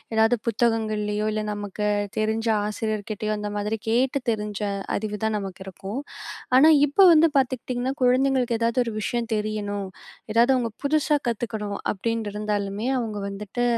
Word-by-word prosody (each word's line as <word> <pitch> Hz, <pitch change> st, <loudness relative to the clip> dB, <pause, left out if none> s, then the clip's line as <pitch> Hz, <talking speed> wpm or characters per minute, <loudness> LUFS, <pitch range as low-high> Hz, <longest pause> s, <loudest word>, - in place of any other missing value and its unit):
எதாவது 225 Hz, +2 st, +4 dB
புத்தகங்கள்லயோ! 215 Hz, -2 st, 0 dB
இல்ல 215 Hz, 0 st, -1 dB
நமக்கு 205 Hz, 0 st, -4 dB, 0.3 s
தெரிஞ்ச 220 Hz, +1 st, 0 dB, 0.2 s
ஆசிரியர்கிட்டேயோ 215 Hz, 0 st, -2 dB
அந்த 210 Hz, -, -3 dB
மாதிரி 210 Hz, +2 st, -1 dB
கேட்டு 255 Hz, +4 st, +2 dB
தெரிஞ்ச 210 Hz, -1 st, -3 dB, 0.4 s
அறிவு 210 Hz, 0 st, -3 dB
தான் 220 Hz, 0 st, 0 dB
நமக்கு 195 Hz, -2 st, -6 dB
இருக்கும். 195 Hz, +5 st, -6 dB, 0.6 s
ஆனா 295 Hz, +4 st, +8 dB, 0.2 s
இப்போ 295 Hz, +7 st, +3 dB
வந்து 320 Hz, +1 st, +6 dB
பார்த்துக்கிட்டீங்கன்னா, 255 Hz, 0 st, -1 dB
குழந்தைங்களுக்கு 255 Hz, -2 st, +2 dB
எதாவது 235 Hz, +2 st, +2 dB
ஒரு 230 Hz, -, -4 dB
விஷயம் 235 Hz, +2 st, -2 dB
தெரியணும், 205 Hz, -2 st, -2 dB, 0.4 s
எதாவது 235 Hz, +4 st, +5 dB
அவுங்க 235 Hz, -2 st, -1 dB
புதுசா 300 Hz, 0 st, +2 dB
கத்துக்கணும், 215 Hz, -3 st, -3 dB, 0.2 s
அப்பிடின்ட்டிருந்தாலுமே 210 Hz, -1 st, -2 dB
அவுங்க 220 Hz, -3 st, -3 dB
வந்துட்டு 205 Hz, +4 st, -3 dB
220 Hz, 130 wpm, -24 LUFS, 210-240 Hz, 0.6 s, ஆனா